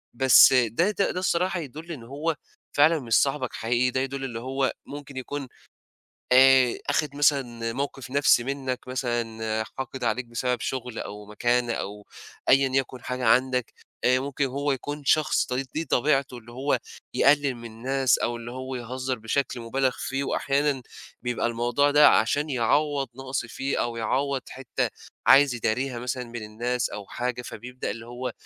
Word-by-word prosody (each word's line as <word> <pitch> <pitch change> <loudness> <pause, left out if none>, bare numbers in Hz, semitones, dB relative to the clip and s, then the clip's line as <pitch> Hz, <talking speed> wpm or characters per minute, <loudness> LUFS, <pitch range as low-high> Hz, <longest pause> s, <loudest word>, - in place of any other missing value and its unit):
بس 130 +1 +7
ده 125 - +3
ده 200 -1 0
ده 180 - -3
الصراحة 180 0 0
يدُل 160 +3 -8
إن 140 -8 -7
هو 145 +7 -2 0.4
فعلًا 155 +3 +5
مش 120 -4 -4
صاحبك 135 -3 -1
حقيقي، 120 +2 +1
ده 130 - 0
يدُل 135 +1 -3
اللي 120 -4 -4
هو 130 +2 -1
ممكن 145 -1 -9
يكون 135 +1 -5 0.9
آآ 130 -1 +6
آخِد 145 0 0
مثلًا 125 -6 +1
موقِف 135 0 -4
نَفْسي 135 -3 +4
منّك 130 -2 -4
مثلًا 115 -3 -2
حاقد 130 -1 -5
عليك 125 +1 0
بسبب 120 +1 -2
شُغل 125 -2 -4
أو 105 0 -7
مكانة 120 +3 0
أو 105 -1 -5 0.4
أيًا 135 0 +5
يَكُن 130 -1 -1
حاجة 125 0 -3
عندك، 125 +1 +2 0.3
آآ 125 0 +4
ممكن 140 +1 -2
هو 140 +2 -1
يكون 145 +2 -5
شخص 155 +2 +3
ط - - -7
دي 135 +2 -2
دي 160 - -1
طبيعته 135 -2 +1
اللي 120 0 -14
هو 135 +4 0 0.4
يقلِّل 140 -1 +4
من 120 -1 -9
الناس 130 +3 +1
أو 120 - -1
اللي 120 0 -8
هو 130 +1 -6
يهزّر 130 +1 -4
بشكل 120 +3 -2
مُبالغ 130 +3 0
فيه 135 +1 -2
وأحيانًا 140 -1 0 0.4
بيبقى 120 -1 -1
الموضوع 120 +4 +1
ده 150 +1 +7
عشان 145 +7 +2
يعوّض 140 +3 +1
نَقْص 130 -1 -4
فيه 135 +4 -2
أو 120 -1 -3
يعوّض 130 +4 -1
حتّة 135 -1 -3 0.4
عايز 135 -1 +7
يداريها 120 +2 -1
مثلًا 125 +1 -3
من 120 -1 -7
الناس 120 +3 -2
أو 100 -1 -7
حاجة، 125 +2 -3
فبيبدأ 125 +2 -6
اللي 115 0 -7
هو 120 +1 -5
130 Hz, 165 wpm, -26 LUFS, 120-140 Hz, 0.9 s, بس